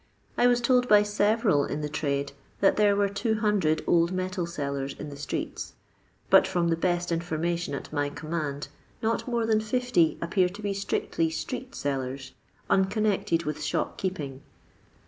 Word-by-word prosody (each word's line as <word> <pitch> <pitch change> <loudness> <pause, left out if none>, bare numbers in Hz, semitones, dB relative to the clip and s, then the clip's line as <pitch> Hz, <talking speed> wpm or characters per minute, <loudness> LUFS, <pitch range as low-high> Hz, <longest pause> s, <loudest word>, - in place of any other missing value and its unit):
I 245 - +4
was 245 0 +3
told 245 +1 +3
by 210 -2 +6
several 205 - +2
in 150 - -3
the 150 - -2
trade 140 -2 -2 0.3
that 195 - +4
there 205 -1 +4
were 200 0 +2
200 205 -5 +1
old 170 0 +3
metal 185 -1 -2
sellers 140 -4 -3
in 150 - -7
the 140 - -8
streets, 140 - -4 0.6
but - - +7
from 170 -1 +1
the 165 - +3
best 175 +1 0
infonuation 170 -1 -1
at 140 - -8
my 145 -1 0
com 155 +2 -9
mand 150 -4 -2 0.4
not 225 +3 0
more 235 -2 0
than 220 -1 +2
50 225 -6 +1
appear 180 +2 +1
to 200 +4 -10
be 200 -1 0
strictly 195 -4 -1
«<re«^sellers, 140 - -4 0.4
unconnected 190 -3 +1
with 150 -1 -4
shop 150 - -2
keeping. 145 -8 -4
175 Hz, 160 wpm, -27 LUFS, 150-210 Hz, 0.6 s, but